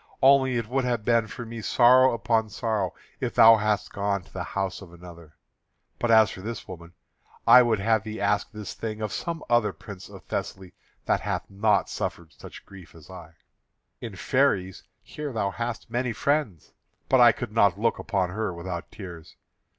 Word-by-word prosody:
Only 135 -1 +5
it 115 -2 -3
would 130 +3 -1
have 120 -4 -2
been 115 -2 +2
for 120 +2 -8
me 115 0 -7
sorrow 130 +3 +5
upon 115 -1 0
sorrow 105 -4 -2 0.2
if - - -3
thou 115 0 +8
hadst 105 -1 -1
gone 100 -1 -1
to 95 - -22
the 95 - -4
house 95 0 -2
of 95 -3 -12
another. 85 -2 -14 0.6
But 120 - -1
as 110 -2 +5
for 95 - -9
this 115 +2 -7
woman, 85 -1 -11 0.5
I 125 - +9
would 120 -3 +2
have 110 +1 +1
thee 110 0 -7
ask 100 0 0
this 105 -3 -7
thing 110 -1 -6
of 105 - -3
some 170 -2 -4 0.3
prince 100 -3 -11
of - - -13
Thessaly 95 -2 -5 0.3
that - - +1
hath - - -4
not 105 +1 +1
suffered 80 -4 -5
such - - -13
grief 95 -4 -14
as 80 +2 -15
I. 85 -3 -12 0.6
In 115 -4 -7
Pheræ 95 -5 0 0.2
here 150 -1 -7
thou 105 -4 -1
hast 115 +2 -5
many 120 0 -1
friends; 115 - -2 0.3
but 130 -2 +4
I 120 - +8
could 120 -4 -6
not 100 -3 +2
look 115 +1 0
upon 95 -5 -1
her 110 +1 -2
without 85 0 -6
tears. 90 -6 -10
105 Hz, 180 wpm, -25 LUFS, 95-115 Hz, 0.6 s, I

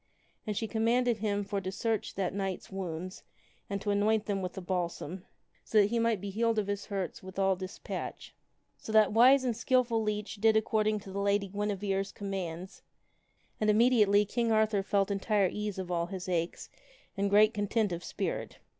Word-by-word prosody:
And 210 -2 -2
she 225 - -1
commanded 235 +2 +1
him 205 -1 -1
for 200 0 -3
to 185 0 -4
search 225 +2 -2
that 185 -2 -1
knight's 195 -1 -4
wounds 185 -1 -5 0.5
and 200 0 -2
to 205 - -1
anoint 210 +1 +2
them 200 -2 -1
with 180 -1 -4
the - - -6
balsam, 180 0 -3 0.4
so 220 - -1
that 205 0 +5
he 235 - +1
might 230 -3 +1
be 200 +1 -5
healed 225 +2 +1
of 210 - +1
his 200 0 -4
hurts 195 -3 -4
with 190 0 -11
all 195 -1 +3
despatch. 185 +1 -6 0.5
So - - -7
that 215 -2 +5
wise 255 +4 +6
and 245 -3 0
skilful 240 -1 +2
leech 210 0 -3
did 220 +1 +4
according 215 -1 +1
to 195 -2 -10
the 200 - -3
Lady 200 0 +1
Guinevere's 200 -1 -2
commands, 190 -3 -5 0.8
and 215 - +1
immediately 210 -2 +5
King 230 +2 0
Arthur 215 -2 +3
felt 195 0 +1
entire 200 -1 +1
ease 210 -2 -4
of 185 -1 -5
all 170 -1 0
his 185 -1 -6
aches 170 -2 -2 0.4
and 200 0 0
great 210 +2 +5
content 210 0 0
of 170 0 -4
spirit. - - -4
205 Hz, 185 wpm, -30 LUFS, 190-220 Hz, 0.8 s, wise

